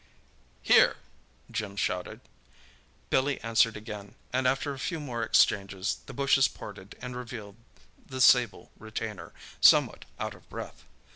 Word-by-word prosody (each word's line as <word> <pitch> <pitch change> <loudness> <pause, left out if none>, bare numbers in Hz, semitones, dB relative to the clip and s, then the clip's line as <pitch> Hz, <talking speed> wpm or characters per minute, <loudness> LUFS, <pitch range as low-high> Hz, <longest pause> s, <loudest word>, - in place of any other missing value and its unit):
"Here!" - - +5 0.5
Jim 100 -2 -4
shouted. 90 -2 -2 0.9
Billy 135 +1 +2
answered 115 0 +2
again, 105 -2 -9 0.2
and 130 0 +2
after 140 +3 0
a 135 - -9
few 165 +3 -3
more 125 -6 -4
exchanges, 100 -3 +2
the - - -8
bushes 140 -1 +4
parted 100 -1 -11
and 125 0 -5
revealed 115 -4 -8 0.5
the 130 -1 -8
sable 125 -5 +4
retainer, 110 -5 -6 0.3
somewhat - - +5
out - - -3
of - - -19
breath. - - -8
115 Hz, 130 wpm, -28 LUFS, 100-130 Hz, 0.9 s, Here